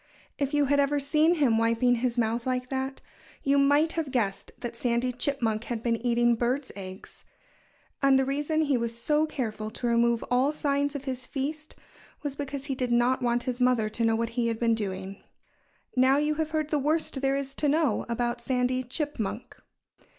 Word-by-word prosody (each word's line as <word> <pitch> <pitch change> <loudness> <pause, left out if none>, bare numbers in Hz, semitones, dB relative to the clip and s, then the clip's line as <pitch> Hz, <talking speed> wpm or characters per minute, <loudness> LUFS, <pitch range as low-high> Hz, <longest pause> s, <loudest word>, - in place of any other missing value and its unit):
If 280 -1 0
you 290 -1 +3
had 285 +1 +2
ever 285 +1 +2
seen 305 +4 +3
him 255 -8 +3
wiping 230 +2 +2
his 245 0 -1
mouth 230 +1 0
like 255 0 -1
that, 265 0 -3 0.4
you 280 0 +3
might 290 +3 +4
have 325 -4 -2
guessed 220 -7 -1
that 240 - -6
Sandy 245 +1 0
Chipmunk 235 -4 -1
had 230 -2 -4
been 230 -1 0
eating 240 0 +3
birds' 250 +4 -1
eggs. 190 -1 -9 0.8
And 275 -1 +5
the 265 - +2
reason 295 +3 0
he 280 -5 +1
was 230 0 -3
so 300 +6 +1
careful 215 -7 -4
to 235 +3 -6
remove 235 0 +2
all 255 +4 +3
signs 285 -1 0
of 280 - -4
his 260 -2 -4
feast 305 +2 -4 0.5
was 285 -2 -3
because 280 -1 -5
he 280 - -2
did 250 -2 -2
not 245 +2 +3
want 240 0 +1
his 250 0 -3
mother 250 -4 +3
to 230 +2 -2
know 225 0 +3
what 230 0 -1
he 235 0 -1
had 230 -1 -1
been 230 0 +2
doing. 195 -2 -4 0.7
Now 260 +2 +5
you 300 +1 +1
have 315 0 -2
heard 310 -1 -2
the 300 - +2
worst 300 -1 0
there 270 0 +2
is 275 -1 -3
to 295 +1 0
know 295 -6 +1
about 240 0 -1
Sandy 255 +1 0
Chipmunk. 250 -4 -4
255 Hz, 195 wpm, -27 LUFS, 235-285 Hz, 0.8 s, And